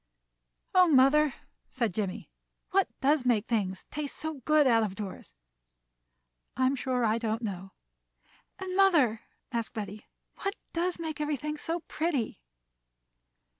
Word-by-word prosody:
"Oh, 365 -1 +7
mother," 280 0 +5 0.3
said 235 -7 -1
Jimmie, 205 +1 -3 0.4
"what 390 0 +3
does 285 0 +3
make 230 -4 +2
things 195 -5 -1
taste 295 -2 -4
so 315 -3 -4
good 305 -1 +5
out 230 -3 +5
of 205 -3 -2
doors?" 200 -3 -7 1.2
"I'm 260 +1 +3
sure 250 -2 0
I 220 +1 +2
don't 225 0 -2
know." 195 -2 -5 0.8
"And, 375 -1 -5
mother," 310 - +4 0.3
asked 230 -2 -2
Betty, 210 -1 -6 0.3
"what 395 0 -1 0.2
does 350 +2 0
make 320 -2 -4
everything 300 0 -2
so 330 +3 -3
pretty?" 310 - -2
260 Hz, 130 wpm, -29 LUFS, 220-310 Hz, 1.2 s, Oh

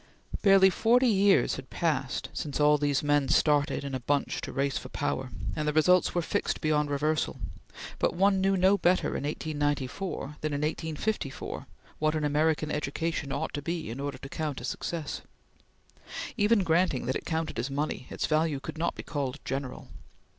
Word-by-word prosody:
Barely 195 -1 +6
forty 240 +7 +3
years 200 -4 +4
had - - -9
passed 140 -7 -1
since 145 -1 -4
all 150 0 +5
these 145 -1 +1
men 145 -1 +2
started 145 -1 +3
in 140 -1 -5
a 130 - -1
bunch 140 +3 0
to - - -5
race 140 -1 0
for - - -10
power, 130 -2 -2 0.3
and 150 0 -2
the 150 - +1
results 180 +5 +4
were 175 - +1
fixed - - -1
beyond 150 -1 +1
reversal; 155 +2 0 0.6
but - - +1
one 195 +1 +3
knew 195 0 +3
no 190 +2 +4
better 180 +1 +3
in - - -3
1894 145 +1 -2
than 155 -1 -2
in 145 - -1
1854 155 +1 -3 0.3
what 155 0 +1
an 155 - -1
American 150 +1 +1
education 150 0 -2
ought 140 - -2
to 145 - -3
be 165 -4 -3
in 120 - -6
order 140 0 -3
to - - -9
count 150 -1 -3
as 125 - -5
success. 165 -4 -4 1.1
Even 210 -2 +3
granting 165 -6 +2
that 130 - -1
it - - -3
counted 160 -5 -2
as 120 +4 -2
money, 140 -2 -3
its - - -2
value 155 -2 +1
could 155 - -7
not 170 - 0
be - - -7
called 140 -2 -3
general. 135 -1 -4
150 Hz, 180 wpm, -29 LUFS, 140-170 Hz, 1.1 s, Barely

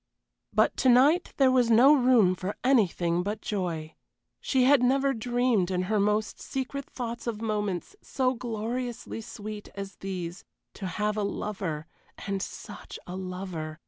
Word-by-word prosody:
But - - +3
to 260 - +3
night 280 +8 +5
there 265 -2 +5
was 250 -2 +3
no 245 +6 +7
room 245 -9 +5
for 185 +2 -4
anything 180 -9 +2
but 205 +4 -3
joy. 170 -6 -3 0.5
She 260 -2 +2
had 270 0 +6
never 270 +2 +3
dreamed 240 -5 +1
in 180 -1 0
her 210 +3 0
most 210 +2 0
secret 270 +1 -4
thoughts 235 -1 -6
of 225 -3 -2
moments 210 - -2
so 260 -2 0
gloriously 235 0 -4
sweet 215 -2 -8
as 195 -1 -7
these 180 -2 -5 0.3
to 195 - -5
have 210 +3 -1
a - - +1
lover 190 -6 -3 0.4
and 195 -1 -2
such - - -8
a 180 - -6
lover! 180 -4 -5
215 Hz, 150 wpm, -28 LUFS, 185-250 Hz, 0.5 s, no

